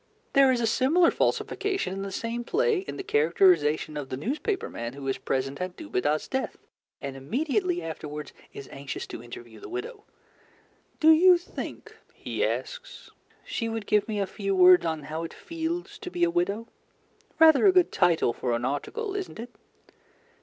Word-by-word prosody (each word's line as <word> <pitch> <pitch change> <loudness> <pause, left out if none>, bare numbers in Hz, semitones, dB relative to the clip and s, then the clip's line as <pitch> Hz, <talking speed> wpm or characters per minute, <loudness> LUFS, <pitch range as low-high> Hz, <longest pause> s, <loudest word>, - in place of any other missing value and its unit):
There 275 -1 +6
is 250 - +1
a - - +2
similar 280 +10 +3
falsification 390 - -1
in 195 - -5
the 195 0 -5
same 230 +4 -3
play 445 - +1
in 380 - -7
the 390 - -5
characterization 155 - +3
of 140 -2 -5
the 130 - -4
newspaper 305 - -2
man 115 +1 -6
who 140 0 -7
is 135 - -1
present 135 +3 -2
at 180 0 -4
Dubedat's 145 +9 -1
death 265 0 -3 0.5
and 140 -1 -4
immediately 305 - -1
afterwards 150 -2 -6 0.2
is 135 - -9
anxious 140 0 -6
to - - -8
interview 120 -1 -11
the - - -10
widow. 415 +4 -6 0.9
"Do 320 -1 +7
you 355 +3 +7
think," 345 - -8 0.2
he - - -3
asks, - - -4 0.3
"she 230 -1 -3
would 225 -2 -4
give 210 +2 +2
me 215 -2 -2
a 200 - +1
few 195 0 -3
words 180 -2 +7
on 160 -2 -3
'How 155 +2 -5
it - - -9
Feels 340 +5 -5
to 390 - -6
be 355 -1 -2
a 345 - +3
Widow?' 230 - -1 0.7
Rather 320 +3 +7
a - - +8
good 365 -2 +3
title 170 -9 +2
for 120 0 -2
an 120 +1 -2
article, 390 - -3
isn't 390 -2 -5
it?" 240 +2 -7
225 Hz, 175 wpm, -27 LUFS, -, 0.9 s, a